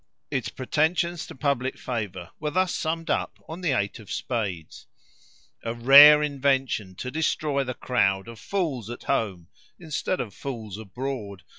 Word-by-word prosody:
Its 130 -4 -1
pretensions 160 +5 0
to - - -10
public 135 -1 -1
favour 100 -8 -5
were 150 - -2
thus 185 +3 +1
summed 165 +1 -2
up - - -1
on 165 +3 -7
the 175 - 0
eight 100 -3 -1
of 105 - -11
spades: 100 -10 -4 0.8
"A 115 0 -3
rare 145 +5 +9
invention 135 -8 0
to 125 +7 -5
destroy 150 -2 0
the 125 -1 -5
crowd 100 -5 +1
Of 115 -2 -10
fools 145 - -2
at 120 - -7
home 95 -6 -1 0.3
instead 170 +2 -2
of 105 -5 -4
fools 110 -6 -6
abroad. 110 -3 -5
130 Hz, 150 wpm, -26 LUFS, 105-150 Hz, 0.8 s, rare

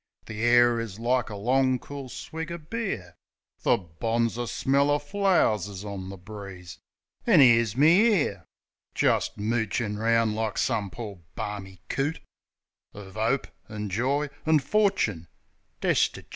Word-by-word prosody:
The 110 0 -6
air 120 0 +5
is 110 -4 -5
like 120 +1 0
a 105 - -6
long, 130 +5 +2
cool 140 +1 -8
swig 160 +6 -6
o' 170 - -4
beer. 160 - -4 0.5
The - - +3
bonzer 115 +7 -2
smell 140 +4 +1
o' 145 - +4
flow'rs 160 - +1
is 100 0 -8
on 95 -2 -6
the 95 - -8
breeze. 95 -4 -10 0.5
An' 195 -9 +6
'ere's 115 -4 +5
me, 170 - +6
'ere, 145 - +1 0.5
Jist - - +1
moochin' 110 -1 -1
round 115 -1 +2
like 110 -1 -2
some 100 -2 0
pore, 105 -3 -8 0.2
barmy 95 -3 -6
coot, 145 +4 -1 0.8
Of 100 -1 -10
'ope, 115 +5 +1 0.2
an' 105 -2 -5
joy, 135 +8 0
an' 160 0 +4
forchin 140 - +1 0.6
destichoot. - - +1
115 Hz, 140 wpm, -26 LUFS, 105-140 Hz, 0.8 s, An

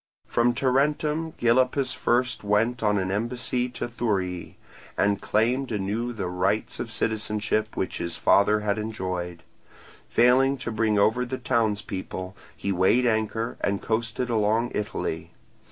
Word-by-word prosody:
From 120 +1 +2
Tarentum 150 +5 +1
Gylippus 130 +2 +2
first 125 -1 0
went 110 +4 +1
on 105 -2 +2
an 95 -1 -1
embassy 120 +3 -1
to 125 - -4
Thurii, 100 -7 -2 0.4
and 100 0 +2
claimed 125 +5 +1
anew 105 +4 -2
the 110 -5 -4
rights 90 +1 -1
of - - -4
citizenship 110 0 -1
which 95 - -2
his 85 - -3
father 105 +2 +4
had 105 0 0
enjoyed; 90 -5 -4 0.7
failing 130 +3 +4
to 120 - -4
bring 110 -1 +1
over 110 +5 +3
the 130 +1 -4
townspeople, 105 -6 -2 0.2
he 100 - -2
weighed 95 +7 +3
anchor 110 0 0
and 100 -1 0
coasted 115 +2 -1
along 110 +2 +1
Italy. 105 - -3
110 Hz, 135 wpm, -26 LUFS, 100-125 Hz, 0.7 s, father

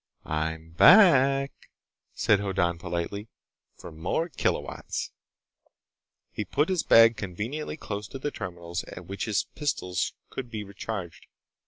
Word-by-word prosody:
"I'm 80 +1 -3
back," 140 - +6 0.6
said 105 -2 +3
Hoddan 90 -4 0
politely, 90 +4 -4 0.5
"for - - -10
more 90 - -2
kilowatts." - - -2 1.2
He 105 - -3
put 145 - 0
his 185 -3 +1
bag 115 0 +7
conveniently 110 - -4
close 105 -7 -5
to 135 - -8
the 145 +2 -3
terminals 85 -3 -5
at 90 - -10
which 100 +3 -4
his 105 -3 +1
pistols 90 - -2 0.2
could 130 -2 -6
be 110 -2 -5
recharged. 100 -2 -6
100 Hz, 125 wpm, -27 LUFS, 85-135 Hz, 1.2 s, bag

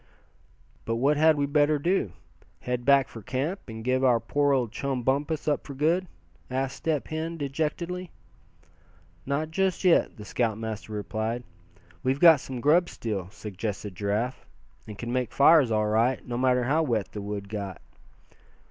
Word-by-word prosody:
"But 115 - -2
what 140 +6 +2
had 155 +1 +4
we 145 - +1
better 145 +1 +3
do 155 - 0 0.5
head 125 -1 -3
back 140 -2 +5
for 115 - -10
camp, 135 - -2
and 110 -1 -7
give 130 +2 +1
our 125 -3 +4
poor 145 +5 +1
old 125 -5 +1
chum 130 +2 -3
Bumpus 145 +5 0
up 150 - +1
for 140 - -9
good?" 165 +6 +1 0.4
asked 130 +1 -2
Step 155 -4 -2
Hen, 160 +1 -3
dejectedly. 160 +5 -3 1.2
"Not 150 +3 -1
just 190 +2 0
yet," 180 -3 +3
the 105 - -9
scoutmaster 110 -1 -2
replied. 110 +3 -3 0.6
"We've 130 +5 0
got 165 -3 +8
some 130 -2 -6
grub 170 +6 +4
still," 100 -6 -4
suggested 105 0 -5
Giraffe, 105 +6 -2 0.4
"and 105 -2 -8
can 120 +3 -4
make 125 -1 -1
fires 145 -2 +6
all 110 -1 +1
right, 115 +4 +1
no 120 - -3
matter 125 0 +2
how 145 +6 +2
wet 115 -10 -1
the 105 - -6
wood 100 0 -5
got." 100 -3 -5
130 Hz, 160 wpm, -27 LUFS, 110-150 Hz, 1.2 s, got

